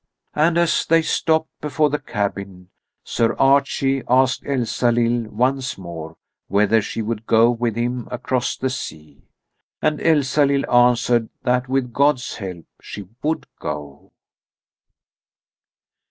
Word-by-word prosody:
And 165 Hz, +3 st, +2 dB
as 170 Hz, -1 st, +2 dB
they 165 Hz, 0 st, +4 dB
stopped 160 Hz, 0 st, 0 dB
before 150 Hz, 0 st, +1 dB
the 150 Hz, -, -1 dB
cabin, 100 Hz, -3 st, -4 dB, 0.3 s
Sir 115 Hz, -, 0 dB
Archie 135 Hz, 0 st, +2 dB
asked 130 Hz, +1 st, +3 dB
Elsalill 120 Hz, -3 st, 0 dB
once 125 Hz, +4 st, -1 dB
more 85 Hz, -3 st, -8 dB, 0.3 s
whether 105 Hz, +3 st, +3 dB
she 110 Hz, +2 st, -4 dB
would 110 Hz, 0 st, -4 dB
go 115 Hz, +1 st, +5 dB
with 120 Hz, -2 st, -2 dB
him 120 Hz, +1 st, -2 dB
across 125 Hz, 0 st, -2 dB
the 130 Hz, 0 st, -2 dB
sea. 75 Hz, -, -8 dB, 0.6 s
And 155 Hz, -1 st, 0 dB
Elsalill 140 Hz, -2 st, +2 dB
answered 120 Hz, -1 st, +3 dB
that 125 Hz, 0 st, 0 dB
with 130 Hz, -2 st, -1 dB
God's 140 Hz, -1 st, +1 dB
help 90 Hz, -5 st, -7 dB, 0.2 s
she 100 Hz, -3 st, -9 dB
would 155 Hz, +2 st, -1 dB
go. 75 Hz, -1 st, -7 dB
125 Hz, 120 wpm, -21 LUFS, 110-135 Hz, 0.6 s, go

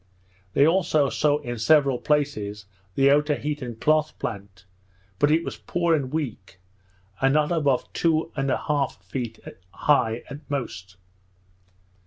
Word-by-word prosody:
They 140 Hz, -, +5 dB
also 160 Hz, -5 st, +2 dB
saw 150 Hz, -1 st, +2 dB
in 120 Hz, -1 st, -5 dB
several 140 Hz, 0 st, +4 dB
places 105 Hz, -9 st, -1 dB, 0.3 s
the 135 Hz, 0 st, +4 dB
Otaheitean 145 Hz, -3 st, 0 dB
cloth 155 Hz, +2 st, +1 dB
plant, 100 Hz, -3 st, -7 dB, 0.5 s
but 145 Hz, -, +4 dB
it 160 Hz, +2 st, +3 dB
was 135 Hz, -7 st, -6 dB
poor 170 Hz, +8 st, 0 dB
and 135 Hz, -5 st, 0 dB
weak, 115 Hz, -12 st, -5 dB, 0.6 s
and 135 Hz, +2 st, +3 dB
not 150 Hz, +2 st, +2 dB
above 145 Hz, -6 st, 0 dB
two 165 Hz, -1 st, +1 dB
and 135 Hz, -2 st, -1 dB
a -, -, +2 dB
half 140 Hz, -9 st, -2 dB
feet 115 Hz, +3 st, -5 dB, 0.3 s
high 115 Hz, 0 st, +1 dB
at 145 Hz, -, -8 dB
most. 95 Hz, -9 st, -5 dB
140 Hz, 135 wpm, -24 LUFS, 115-150 Hz, 0.6 s, They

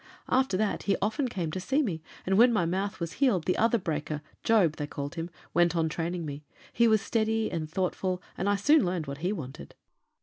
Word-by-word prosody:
"After 260 Hz, -7 st, +2 dB
that 215 Hz, +1 st, 0 dB
he 195 Hz, -, +3 dB
often 220 Hz, +6 st, 0 dB
came 180 Hz, -9 st, -3 dB
to 185 Hz, -, -3 dB
see 270 Hz, +11 st, +1 dB
me, 170 Hz, -, -3 dB, 0.2 s
and 190 Hz, -, +2 dB
when 240 Hz, +4 st, +7 dB
my 210 Hz, -7 st, +2 dB
mouth 195 Hz, +4 st, -2 dB
was 170 Hz, -1 st, -3 dB
healed 205 Hz, -, +3 dB
the 185 Hz, -, +2 dB
other 230 Hz, +1 st, +3 dB
breaker, 155 Hz, -5 st, -3 dB, 0.2 s
Job, 190 Hz, -9 st, +3 dB
they 150 Hz, -, -3 dB
called 145 Hz, +1 st, -5 dB
him, 165 Hz, 0 st, -4 dB, 0.2 s
went 175 Hz, 0 st, +3 dB
on 160 Hz, -1 st, +1 dB
training 170 Hz, +1 st, -3 dB
me; 145 Hz, 0 st, -6 dB, 0.3 s
he 235 Hz, -, +4 dB
was 220 Hz, -2 st, +3 dB
steady 220 Hz, -1 st, 0 dB
and 155 Hz, -2 st, -3 dB
thoughtful, 185 Hz, +1 st, -1 dB, 0.2 s
and 195 Hz, -, -1 dB
I 205 Hz, -, +3 dB
soon 290 Hz, +9 st, +4 dB
learned 175 Hz, -3 st, -1 dB
what 140 Hz, 0 st, -6 dB
he 180 Hz, +4 st, 0 dB
wanted." 140 Hz, -10 st, -7 dB
185 Hz, 215 wpm, -28 LUFS, 165-220 Hz, 0.3 s, when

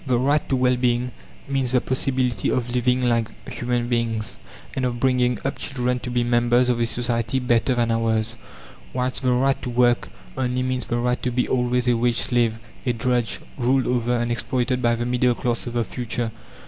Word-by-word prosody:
The 125 Hz, -2 st, +2 dB
"right 140 Hz, +4 st, +2 dB
to 135 Hz, -, +2 dB
well 125 Hz, -1 st, +2 dB
being" 125 Hz, 0 st, +1 dB, 0.4 s
means 135 Hz, -2 st, 0 dB
the 125 Hz, -, +5 dB
possibility 130 Hz, -4 st, 0 dB
of 120 Hz, -1 st, -1 dB
living 125 Hz, +1 st, +2 dB
like 115 Hz, -2 st, +2 dB, 0.2 s
human 120 Hz, -1 st, -2 dB
beings, 115 Hz, -2 st, -1 dB, 0.4 s
and 130 Hz, -, -1 dB
of 120 Hz, -1 st, -1 dB
bringing 125 Hz, -1 st, +2 dB
up 135 Hz, -, -2 dB
children 125 Hz, -2 st, -1 dB
to 125 Hz, -, -6 dB
be 120 Hz, 0 st, +1 dB
members 120 Hz, +1 st, +3 dB
of 120 Hz, -1 st, +1 dB
a 115 Hz, -, +2 dB
society 120 Hz, +1 st, 0 dB
better 125 Hz, 0 st, +2 dB
than 120 Hz, -1 st, +1 dB
ours, 110 Hz, 0 st, 0 dB, 0.6 s
whilst 130 Hz, +1 st, -1 dB
the 130 Hz, -2 st, +2 dB
"right 135 Hz, +2 st, +2 dB
to 125 Hz, -, -4 dB
work" 120 Hz, 0 st, +2 dB, 0.3 s
only 125 Hz, -1 st, -1 dB
means 130 Hz, -2 st, -1 dB
the 120 Hz, -, -1 dB
right 125 Hz, +1 st, 0 dB
to 125 Hz, -, 0 dB
be 125 Hz, 0 st, 0 dB
always 125 Hz, 0 st, +1 dB
a 120 Hz, -, +4 dB
wage 120 Hz, 0 st, +1 dB
slave, 120 Hz, -3 st, +2 dB, 0.3 s
a 125 Hz, -, +1 dB
drudge, 120 Hz, 0 st, 0 dB, 0.2 s
ruled 130 Hz, +2 st, +2 dB
over 120 Hz, 0 st, +1 dB
and 120 Hz, 0 st, -1 dB
exploited 125 Hz, +1 st, -1 dB
by 120 Hz, -1 st, +3 dB
the 120 Hz, +1 st, -2 dB
middle 125 Hz, 0 st, +2 dB
class 120 Hz, 0 st, -2 dB
of 120 Hz, -, -4 dB
the 120 Hz, -1 st, +1 dB
future. 120 Hz, 0 st, -3 dB
125 Hz, 200 wpm, -23 LUFS, 120-125 Hz, 0.6 s, the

